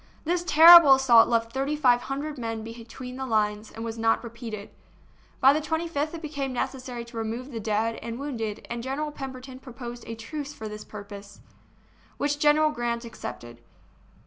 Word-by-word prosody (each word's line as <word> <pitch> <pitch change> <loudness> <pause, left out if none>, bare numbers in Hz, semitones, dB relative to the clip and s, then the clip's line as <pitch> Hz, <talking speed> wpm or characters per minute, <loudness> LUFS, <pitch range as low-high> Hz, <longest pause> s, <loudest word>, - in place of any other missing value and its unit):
This 350 +2 0
terrible 325 -2 +9
assault 245 -4 +6
left 230 -1 0
thirty 275 +3 -1
five 250 -5 +3
hundred 285 +2 -5
men 225 -2 -4
between 235 +3 -9
the 265 - -4
lines, 210 -1 0
and 225 +1 -7
was 225 0 -5
not 225 +1 +2
repeated. 230 -3 -8 0.7
By 270 +1 +6
the 305 - 0
25th 320 -1 -2
it 330 - -9
became 285 -3 -3
necessary 250 -1 -4
to 235 0 -11
remove 230 +4 -4
the 230 - -5
dead 220 +1 -1
and 230 0 -6
wounded, 230 -7 -5
and 235 0 -5
General 280 +4 -3
Pemberton 260 -2 -8
proposed 240 -2 -9
a 230 - -5
truce 290 +6 -7
for 220 - -7
this 210 0 -8
purpose, 200 -1 -11 0.8
which 290 0 -1
General 305 +1 +4
Grant 235 -2 -3
accepted. 120 - -9
245 Hz, 170 wpm, -26 LUFS, 225-285 Hz, 0.8 s, terrible